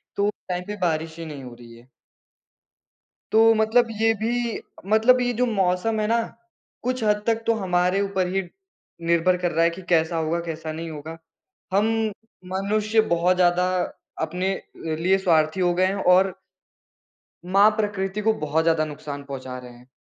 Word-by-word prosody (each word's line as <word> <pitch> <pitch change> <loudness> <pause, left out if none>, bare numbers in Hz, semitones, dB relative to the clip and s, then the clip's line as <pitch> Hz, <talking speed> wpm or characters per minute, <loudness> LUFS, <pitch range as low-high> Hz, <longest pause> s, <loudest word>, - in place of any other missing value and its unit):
तो 200 +1 +2 0.2
टाइम 180 0 -2
पे 210 - -4
बारिश 160 -1 -1
ही 165 - -5
नहीं 145 -4 -8
हो 125 -1 -9
रही 120 -1 -14
है। 120 +2 -19 1.5
तो 225 +1 +6
मतलब 225 +2 +3
ये 225 0 +4
भी 235 0 -1 0.3
मतलब 250 +3 +5
ये 245 0 0
जो 250 +2 +1
मौसम 200 0 0
है 210 - 0
ना, 230 +1 +2 0.6
कुछ 255 -1 -1
हद 210 0 +1
तक 225 0 +1
तो 230 - +4
हमारे 180 -1 +1
ऊपर 190 -2 0
ही 195 - +2 0.7
निर्भर 170 +2 +3
कर 175 -1 -1
रहा 165 +1 +2
है 170 - +4
कि 170 +3 -8
कैसा 165 0 +2
होगा, 160 +1 0
कैसा 160 -1 -5
नहीं 165 +1 -6
होगा। 155 +2 -8 0.6
हम 205 +3 +3 0.7
मनुष्य 215 +3 +1
बहुत 180 +2 +3
ज़्यादा 180 0 +3 0.5
अपने 180 +4 -1 0.3
लिए 165 +5 +1
स्वार्थी 165 -2 +2
हो 175 -1 +2
गए 185 +1 +2
हैं 195 - -1 0.2
और 190 0 +4 1.1
माँ 195 +3 +5
प्रकृति 205 -1 -2
को 220 +1 +3
बहुत 155 +2 0
ज़्यादा 160 -1 +2
नुकसान 145 -1 -7
पहुँचा 130 -2 -7
रहे 125 -1 -11
हैं। 120 +1 -17
180 Hz, 170 wpm, -24 LUFS, 160-210 Hz, 1.5 s, तो